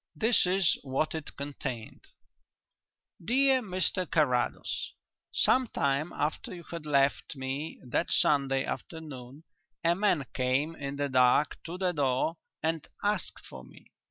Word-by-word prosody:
This 225 -4 +3
is 185 -1 +3
what 135 +3 -1
it 160 -2 -6
contained: 135 -5 -6 1.2
"DEAR 260 +6 +3
MR 185 -3 0
CARRADOS, 125 -6 0 0.4
Some 255 0 +3
time 140 -2 0
after 155 +4 -2
you 170 - -10
had 165 -3 -7
left 140 0 +2
me 135 +4 -4
that 125 - 0
Sunday 135 -2 +3
afternoon, 145 -3 -7 0.4
a 170 0 +4
man 180 -6 +1
came 135 +5 0
in 140 -2 -5
the 145 0 -1
dark 130 +2 +3
to 170 +2 -5
the 185 -1 +1
door 145 +1 0 0.3
and 160 -1 -1 0.2
asked 205 -4 -1
for 65 -1 -10
me. 65 - -17
150 Hz, 130 wpm, -29 LUFS, 135-175 Hz, 1.2 s, a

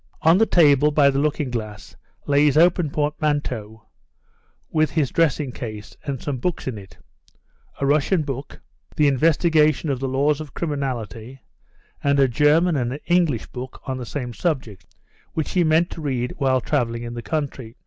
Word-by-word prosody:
On 170 +5 +5
a 225 - +4
table 150 -3 +5
by 145 -2 +4
the 135 - -1
looking 145 -2 -1
glass 110 -4 -6 0.3
lay 145 +1 +3
his 150 0 +3
open 170 -1 +4
portmanteau, 145 -7 -2 0.9
with 155 -1 +2
his 145 -2 0
dressing 150 -4 +1
case 110 -4 -8
and 140 -4 -4
some 140 0 -3
books 175 +3 -3
in 115 -5 -3
it; 95 -1 -15 0.8
a 140 - 0
Russian 155 +4 +2
book, 135 -1 -6 0.4
The 150 - +3
Investigation 155 +1 +3
of 130 - -2
the 135 - -2
Laws 140 +3 +1
of 150 -3 -10
Criminality, 130 - -4 0.6
and 140 0 +2
a 135 - +5
German 150 +7 +3
and 125 -3 -1
an 140 - -6
English 170 -8 +1
book 130 +1 -8
on 130 -1 -3
the 125 - -5
same 125 -3 -5
subject, 120 - -3 0.5
which 160 - -2
he 180 - +2
meant 160 +2 +2
to 165 - -7
read 130 -4 -2
while 130 -2 +2
travelling 115 -4 -1
in 120 0 -6
the 120 - -5
country. 135 -6 -4
140 Hz, 170 wpm, -22 LUFS, 125-155 Hz, 0.9 s, On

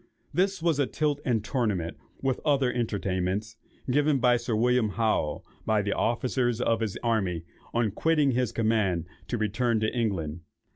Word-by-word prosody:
This 190 +1 +1
was 165 -4 +2
a 140 - +3
tilt 145 +1 -1
and 115 -5 0
tournament, 105 - -1 0.3
with 135 -1 +1
other 140 -4 +2
entertainments, 105 -2 -1 0.3
given 145 +2 +3
to 125 -1 +4
Sir 120 -1 -2
William 120 0 +3
Howe, 110 -8 0 0.2
by 110 -2 +2
the 100 - 0
officers 120 0 0
of 115 -2 +2
his 110 -4 -2
army, 95 -8 0 0.3
on 115 -3 +1
quitting 150 +4 +2
his 125 -2 0
command 110 -7 +1 0.2
to 120 - -1
return 110 +2 +1
to 110 +3 0
England. 90 -9 -1
115 Hz, 155 wpm, -27 LUFS, 105-130 Hz, 0.3 s, to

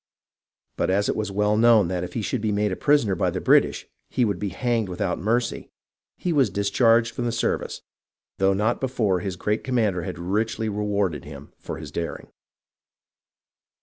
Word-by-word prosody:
But - - 0
as 100 +2 +1
it - - 0
was 105 -2 -2
known 105 +1 +4
that 90 -1 -2
if 90 0 -6
he 115 - -2
should 120 +2 -2
be 110 -1 0
made 105 0 +1
a - - -1
prisoner 140 -7 +2
by 95 - +1
the - - -3
British - - +3 0.2
he 125 - +1
would 100 -5 -1
be 105 - -2
hanged 115 -2 -1
without 90 0 -2
mercy, 115 +5 -1 0.5
he 175 - -1
was 135 -7 +3
discharged 115 +4 +2
from 120 - -3
the 120 - 0
service, 115 - -2 0.6
though 95 0 +3
not 105 +5 0
before 115 -8 +1
his 95 0 -4
great 105 +4 -1
commander 110 -8 0
had 80 - -5
richly 110 +5 -1
rewarded 100 -7 -1
him - - -11
for - - -6
his - - -8
daring. 85 -1 -5
105 Hz, 180 wpm, -24 LUFS, 95-115 Hz, 0.6 s, known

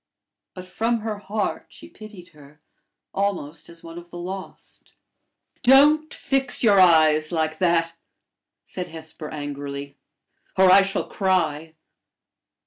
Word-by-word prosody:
But 185 0 -9
from 225 +5 -1
her 215 -1 -4
heart 205 +1 -3
she - - -13
pitied 210 -5 -13
her, 150 -1 -18 0.5
almost 180 -6 -3
as 170 0 -11
one 165 +1 -9
of 175 0 -15
the 175 - -10
lost. 185 +2 -9 0.7
"Don't 295 +4 +5
fix 270 -2 -1
your 205 -4 +5
eyes 155 -3 +4
like 155 -2 -2
that," 170 -2 +1 0.7
said 180 -1 -7
Hesper, 160 -1 -10
angrily, 140 -1 -7 0.6
"or 190 -1 +6
I 195 +1 +8
shall 195 0 -2
cry. 165 -5 -1
175 Hz, 125 wpm, -23 LUFS, 155-200 Hz, 0.7 s, I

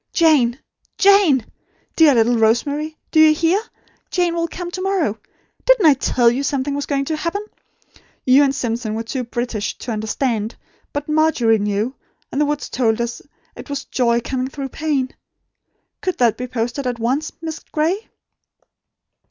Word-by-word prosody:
Jane! 285 -8 +4 0.4
Jane! 395 - +5 0.5
Dear 310 -5 +6
little 235 +1 +3
Rosemary, 285 +8 +1
do 315 - +3
you 310 0 +7
hear? 340 +6 +2 0.5
Jane 355 -2 +1
will 335 0 -1
come 350 +1 -6
to 370 - -5
morrow! 365 - 0 0.4
Didn't - - +4
I 305 - +8
tell 245 -3 +2
you 255 +3 -1
something 280 0 -1
was 285 0 -3
going 275 -1 0
to 315 - -1
happen? 335 +7 -3 0.8
You 265 +3 +6
and 275 -1 +1
Simpson 230 -3 -2
were 225 - -3
too 250 +3 -3
British 240 -3 -3
to 240 - -6
understand; 220 +1 -2 0.4
but 290 0 -4
Margery 305 -8 +3
knew; 205 +4 -1 0.4
and 280 - -1
the - - +4
woods 295 0 -2
told 225 -3 0
us 235 0 -3 0.3
it - - -10
was 285 -1 -4
Joy 235 -2 +1
coming 255 +1 -2
through 270 0 -6
Pain. 285 -3 -1 0.9
Could 370 -2 -2
that 235 -3 +3
be 250 - -5
posted 245 +2 -3
at 245 -1 -2
once, 260 +7 -1
Miss 320 -1 -5
Gray?" 340 +8 -2
275 Hz, 160 wpm, -20 LUFS, 235-315 Hz, 0.9 s, I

